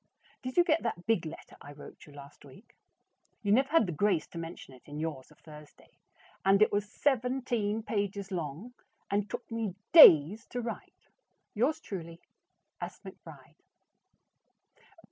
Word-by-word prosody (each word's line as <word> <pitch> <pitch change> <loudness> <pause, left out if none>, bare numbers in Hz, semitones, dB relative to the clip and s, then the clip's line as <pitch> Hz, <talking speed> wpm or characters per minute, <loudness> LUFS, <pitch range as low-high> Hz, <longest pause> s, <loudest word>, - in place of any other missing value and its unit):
Did 255 +3 -7
you 350 - +7
get 330 -2 +1
that 195 -7 -4
big 215 -8 0
letter 155 - -11
I 145 - -11
wrote 145 - -14
you 145 - -15
last 140 0 -14
week? 195 - -17 0.7
You 200 - 0
never 265 +5 +3
had 330 -7 +4
the 180 - -4
grace 175 -1 +1
to 170 - -8
mention 165 -4 -9
it 130 - -16
in 145 0 -8
yours 155 -5 -5
of 150 - -21
Thursday, 150 -1 -16 0.4
and 195 +1 +4
it 215 - +4
was 205 0 -2
seventeen 245 -5 -1
pages 200 -2 -3
long, 175 - -5 0.4
and 205 +1 -1
took 245 - -7
me 225 -5 -3 0.2
DAYS 200 - +8
to 245 - -5
write. 235 -1 -8 0.5
Yours 270 +9 0
truly, 170 - -8 0.6
S. - - -6
McBRIDE. - - -13
200 Hz, 155 wpm, -30 LUFS, 160-235 Hz, 0.7 s, DAYS